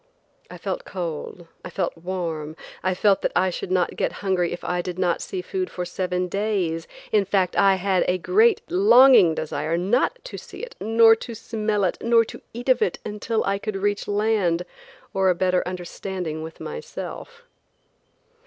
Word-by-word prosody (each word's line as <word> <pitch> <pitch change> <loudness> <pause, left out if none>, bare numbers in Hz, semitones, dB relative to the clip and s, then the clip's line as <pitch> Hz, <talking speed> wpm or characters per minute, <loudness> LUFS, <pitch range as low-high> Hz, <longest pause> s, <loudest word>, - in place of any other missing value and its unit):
I - - -9
felt - - -4
cold, 175 - -6 0.2
I - - -7
felt 180 -3 -2
warm; 165 -3 -4 0.3
I 185 0 0
felt 195 +1 +3
that - - 0
I 185 +1 +3
should 180 - -5
not 180 -1 +1
get - - -1
hungry 180 -3 +1
if 175 - -6
I 180 0 -1
did 180 0 -6
not 180 -2 +1
see 370 -2 -5
food 375 -1 -3
for 180 - -4
seven 180 0 -2
days; 185 -5 -1 0.2
in 210 -2 +4
fact, 190 -2 0
I 195 -1 +5
had 190 0 +1
a 180 - +2
great, 430 - +3
longing 265 - +6
desire 160 +1 -2
not 225 - +1
to - - -7
see - - -11
it, 485 0 -7
nor 225 0 +6
to 230 +1 -7
smell 215 -2 -1
it, 180 - 0
nor 230 -1 +4
to - - -10
eat 240 +2 -8
of 255 -2 +4
it, 175 - +1
until 215 +1 -2
I 195 0 0
could 215 0 -4
reach 205 +1 -1
land 205 -5 +1 0.5
or 190 -1 +3
a 180 - +3
better 185 0 +2
understanding 180 -2 -5
with 160 +1 -8
myself. 475 +1 -7
190 Hz, 180 wpm, -23 LUFS, 180-225 Hz, 0.5 s, longing